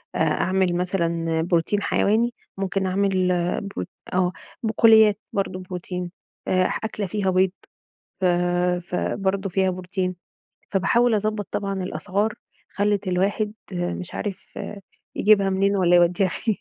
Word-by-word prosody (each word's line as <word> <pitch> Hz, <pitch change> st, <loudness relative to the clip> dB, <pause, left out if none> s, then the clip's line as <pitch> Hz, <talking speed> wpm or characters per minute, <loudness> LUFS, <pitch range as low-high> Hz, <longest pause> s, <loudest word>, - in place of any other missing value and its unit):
أ -, -, -1 dB
أعمل 185 Hz, -2 st, +1 dB
مثلًا 170 Hz, -3 st, 0 dB
بروتين 175 Hz, +4 st, +1 dB
حيواني، 225 Hz, +4 st, +2 dB, 0.2 s
ممكن 195 Hz, 0 st, -1 dB
أعمل 190 Hz, -1 st, +1 dB, 0.3 s
ب 200 Hz, -, -5 dB, 0.3 s
آه 180 Hz, -1 st, +2 dB, 0.3 s
بقوليات 220 Hz, -2 st, +5 dB
برضه 195 Hz, -2 st, -1 dB
بروتين 180 Hz, -1 st, -5 dB, 0.4 s
آآ، 185 Hz, 0 st, +3 dB, 0.2 s
أكلة 215 Hz, -2 st, -3 dB
فيها 195 Hz, +1 st, -1 dB
بيض 185 Hz, 0 st, +3 dB, 0.7 s
ف -, -, -1 dB, 0.6 s
فبرضه 195 Hz, +2 st, -1 dB
فيها 190 Hz, +1 st, +2 dB
بروتين، 185 Hz, 0 st, -3 dB, 0.6 s
فباحاول 235 Hz, +5 st, +3 dB
أضبّط 210 Hz, -1 st, -1 dB
طبعًا 195 Hz, -2 st, -2 dB
الأسعار 190 Hz, +6 st, -1 dB, 0.4 s
خلِّت 205 Hz, -1 st, 0 dB
الواحد 200 Hz, +4 st, 0 dB, 0.2 s
مش 175 Hz, 0 st, -3 dB
عارف 200 Hz, -2 st, -6 dB, 0.6 s
يجيبها 200 Hz, -2 st, +4 dB
منين 195 Hz, +1 st, +2 dB
والّا 175 Hz, -1 st, +4 dB
يوديها 175 Hz, +2 st, +3 dB
فين. 210 Hz, +4 st, -2 dB
190 Hz, 120 wpm, -23 LUFS, 180-205 Hz, 0.7 s, بقوليات